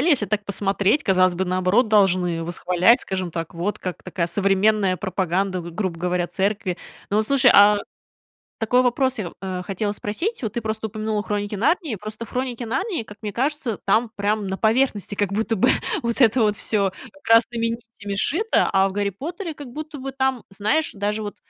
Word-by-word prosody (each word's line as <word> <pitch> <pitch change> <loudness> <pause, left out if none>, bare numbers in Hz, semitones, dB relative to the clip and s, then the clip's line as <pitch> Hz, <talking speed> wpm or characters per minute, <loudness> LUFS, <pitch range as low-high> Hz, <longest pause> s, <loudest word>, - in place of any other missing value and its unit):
идеале, 330 - +2
если 245 -8 +2
так 210 -1 -1
посмотреть, 200 +6 +1
казалось 185 -4 +3
бы, 190 +2 -1
наоборот, 185 +6 +2
должны 185 -5 +3
восхвалять, 180 +6 +3
скажем 185 -2 -3
так, 165 0 -5
вот 180 +5 -2
как 180 -1 -6
такая 170 -4 -2
современная 195 0 +2
пропаганда, 185 0 -1
г 170 - -8
грубо 175 -1 -3
говоря, 180 0 0
церкви. 195 -2 -1 0.3
Но 205 - +2
вот 215 - +1
слушай, 270 -3 +5
а 205 +1 +7 0.8
такой 245 +3 +3
вопрос 260 +1 +1
я, 180 -5 -5
э, 185 -1 -4
хотела 200 +2 -2
спросить. 265 - -3
Вот 220 -4 -3
ты 235 - -2
просто 220 0 -3
упомянула 215 0 -2
"Хроники 205 0 -3
Нарнии". 300 - +1
Просто 215 +3 -7
в - - -17
"Хроники 250 -1 -3
Нарнии", 270 - -2
как 210 -1 -13
мне 210 -3 -5
кажется, 265 -3 -1
там 220 +4 +2
прям 205 0 -1
на 190 0 -3
поверхности 220 -3 +1
как 200 -1 -1
будто 225 +1 0
бы - - +4 0.3
вот 235 +3 -1
это 240 0 +5
вот 210 -1 +2
всё 200 -2 +1 0.3
красными 230 0 +4
нитями 230 -3 -6
сшито, 355 - +1
а 195 0 +4
в 190 - -6
"Гарри 205 0 0
Поттере" 330 - -6
как 290 -2 -10
будто 305 0 -7
бы 270 +1 -6
там, 265 -2 0
знаешь, 215 +10 0
даже 210 +1 -2
вот 205 -1 -6
210 Hz, 190 wpm, -22 LUFS, 195-235 Hz, 0.8 s, а